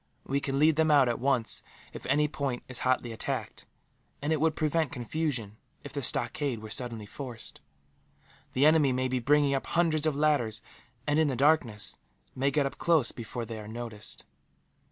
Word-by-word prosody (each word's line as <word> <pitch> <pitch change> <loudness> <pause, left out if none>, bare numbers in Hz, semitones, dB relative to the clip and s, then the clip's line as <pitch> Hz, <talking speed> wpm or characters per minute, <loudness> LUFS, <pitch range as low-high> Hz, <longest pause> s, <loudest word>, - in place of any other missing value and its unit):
We 140 +1 0
can 135 -1 -2
lead 155 +1 +4
them 160 0 +3
out, 140 -4 +6
at 120 - -1
once, 130 -3 +2 0.3
if - - -8
any 150 +3 +3
point 140 -4 -3
is 130 -1 -5
hotly 130 -2 0
attacked; 110 - -4 0.5
and 150 +2 0
it 155 - -1
would 160 -1 +2
prevent 155 -1 0
confusion, 120 -4 -3 0.3
if 145 - -9
the 140 - -3
stockade 135 -1 +1
were 110 0 -9
suddenly 115 -4 -2
forced. 120 +1 -8 0.9
The 135 +3 +3
enemy 155 -4 +5
may 130 +1 0
be 130 0 -1
bringing 145 +3 +3
up 135 - -2
hundreds 160 -2 +2
of 155 - 0
ladders 140 -7 +1 0.4
and, 145 +1 +2
in 160 - +4
the 135 - -1
darkness, 130 -6 +2 0.4
may 135 +2 +1
get 140 0 +1
up 135 - -5
close 160 -8 +3
before 120 0 -6
they 115 -1 -6
are 105 - -9
noticed." 110 -2 -8
135 Hz, 180 wpm, -29 LUFS, 120-150 Hz, 0.9 s, out